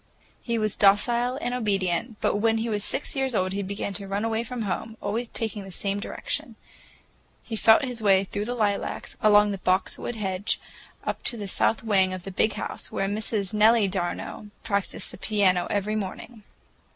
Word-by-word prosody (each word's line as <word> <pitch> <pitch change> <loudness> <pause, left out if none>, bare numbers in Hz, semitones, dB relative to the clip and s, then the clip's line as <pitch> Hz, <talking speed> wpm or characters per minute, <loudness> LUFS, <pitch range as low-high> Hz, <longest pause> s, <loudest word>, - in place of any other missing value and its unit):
He 235 -1 -1
was 215 -2 0
docile 235 +5 +4
and 245 - -1
obedient, 205 -1 -1
but - - +2
when 225 +1 +2
he 225 +1 -1
was 205 -2 -1
six 270 - -1
years 265 -3 0
old 185 -1 +1
he 200 - -1
began 200 +1 -4
to 200 +1 -4
run 200 +3 -1
away 225 0 0
from 235 -1 -4
home, 220 +3 -3
always 225 +4 -2
taking 220 -3 -3
the 195 - -10
same 200 +2 -2
direction. 205 - -4 0.9
He 225 - -5
felt 220 +4 +5
his 245 -3 -3
way 195 -2 +5
through 205 +1 -4
the 245 +2 -3
lilacs, 205 -3 -1
along 210 -1 +6
the 195 - -4
boxwood 185 +6 0
hedge, 195 -1 -1 0.4
up - - -3
to 235 - -1
the 205 -2 -5
south 220 +3 +1
wing 190 -4 +2
of 185 - -8
the 195 - -6
"Big 210 +3 +1
House," - - -5
where 195 - -1
Miss 205 -1 -2
Nellie 215 0 +5
d'Arnault 185 +2 -3 0.2
practiced 200 -2 -1
the - - -11
piano 190 -5 +2
every 205 +1 0
morning. 215 +3 -5
210 Hz, 190 wpm, -26 LUFS, 195-225 Hz, 0.9 s, along